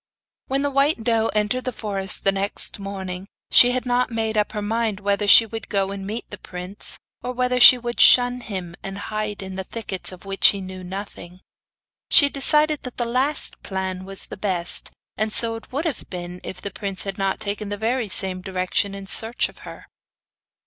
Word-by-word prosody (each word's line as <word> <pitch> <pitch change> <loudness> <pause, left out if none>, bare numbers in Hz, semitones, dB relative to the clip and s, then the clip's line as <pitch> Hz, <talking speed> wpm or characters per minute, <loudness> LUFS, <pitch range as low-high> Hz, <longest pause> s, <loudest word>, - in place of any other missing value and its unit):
When 270 +1 -1
the 285 - -1
white 275 -2 +1
doe 225 -1 +1
entered 215 +4 -1
the 255 - -2
forest 195 -4 -5
next 195 +1 +1
morning, 190 -1 -7 0.2
she 245 - +7
had 250 0 -2
not 250 0 0
made 220 -1 -2
up 210 0 0
her 210 - -4
mind 220 -1 -2
whether 200 0 -1
she 225 - +8
would 225 -1 -8
go 195 -2 -1
and 195 -1 -7
meet 220 +3 -6
the 205 - -9
prince, 180 +2 +1 0.2
or 250 - -5
whether 250 0 0
she 250 +1 +10
would 240 0 -6
shun 245 0 +6
him, 185 -7 -6
and 195 0 -7
hide 210 0 -4
in 190 0 -6
thickets 195 -3 -5
of 185 +1 -13
which 195 0 +3
he 200 - +1
knew 185 -1 -8
nothing. 185 -1 -8 0.7
She 285 - +6
decided 300 +2 +5
that 250 - -9
the 240 - -1
last 260 +5 +1
plan 190 -1 -5
was 195 0 -3
the - - -10
best; 185 -4 -2 0.3
and 215 +1 -1
so 230 +1 +5
it 225 - -10
would 290 +6 -3
have 310 -7 -4
been 180 0 -7
if 180 - -8
the 200 - -5
prince 195 -1 -2
had 195 -1 -6
not 195 0 -1
taken 210 0 -4
the 205 - -4
very 225 +1 -2
same 185 -1 +3
direction 185 +1 -2
in 195 0 -9
search 225 +4 0
of - - -18
her. - - -12
205 Hz, 195 wpm, -22 LUFS, 190-240 Hz, 0.7 s, she